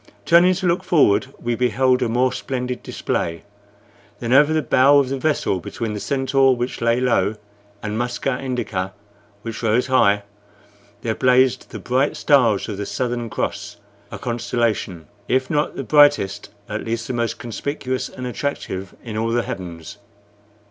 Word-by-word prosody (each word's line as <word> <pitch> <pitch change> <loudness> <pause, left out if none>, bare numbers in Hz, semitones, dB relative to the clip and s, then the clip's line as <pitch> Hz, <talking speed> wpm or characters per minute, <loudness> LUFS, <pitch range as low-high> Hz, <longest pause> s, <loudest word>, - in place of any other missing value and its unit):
Turning 175 +2 +6
to 185 +1 -2
look 175 +1 +1
forward, 145 - +3
we 120 - -2
beheld 125 +2 +2
a 120 - +1
more 125 +2 +2
splendid 125 -1 -4
display. 85 0 -3 0.8
Then, 120 +1 -1
over 145 +3 +6
the 155 -1 +1
bow 135 +3 +5
of 140 -2 +2
the 135 - -2
vessel, 145 -10 0
between 110 +5 -5
the 105 - -4
Centaur, 135 +1 +2
which 120 0 -4
lay 115 +1 +2
low, 110 -5 +1 0.5
and 105 +1 -3
Musca 125 +2 -2
Indica, 115 -8 -3 0.5
which 115 -1 -6
rose 115 +2 +2
high, 105 -6 +3 0.8
there 110 - -1
blazed 130 +2 +2
the - - -7
bright 130 +3 0
stars 120 -9 +3
of 105 -3 -5
the 100 - -3
Southern 120 -2 -2
Cross - - -4 0.3
a - - -5
constellation, 115 -8 -2 0.2
if 130 0 0
not 150 0 0
the - - -4
brightest, 145 -10 +3 0.2
at - - -4
least 115 0 -3
the 130 - -4
most 120 -1 -1
conspicuous 130 +1 -4
and 125 - -8
attractive 120 -8 -4
in 110 -3 -6
all 115 +1 0
the 120 +1 +1
heavens. 85 -1 -7
125 Hz, 160 wpm, -21 LUFS, 110-135 Hz, 0.8 s, Turning